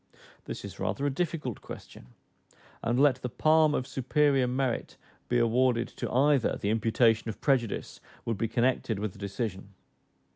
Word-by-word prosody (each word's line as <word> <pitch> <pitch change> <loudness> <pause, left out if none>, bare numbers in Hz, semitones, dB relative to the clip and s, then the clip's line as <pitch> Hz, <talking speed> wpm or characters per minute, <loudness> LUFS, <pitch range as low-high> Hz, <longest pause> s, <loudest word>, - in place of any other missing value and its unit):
This - - -6
is - - -9
rather 140 - -1
a 145 - +1
difficult 150 - -3
question; - - -11 0.7
and 120 +2 0
let 140 -3 +5
the 125 - -3
palm 155 +3 +3
of 130 - -1
superior 135 0 +2
merit 130 -1 -2 0.3
be 120 - +2
awarded 120 +1 +2
to - - -5
either, 140 0 +3
the 100 - 0
imputation 115 0 +2
of 110 - -6
prejudice 125 -6 0 0.3
would 115 -4 -2
be 115 - +1
connected 120 -1 0
with 105 -1 -3
the - - -15
decision. 100 -1 -5
125 Hz, 155 wpm, -29 LUFS, 115-135 Hz, 0.7 s, let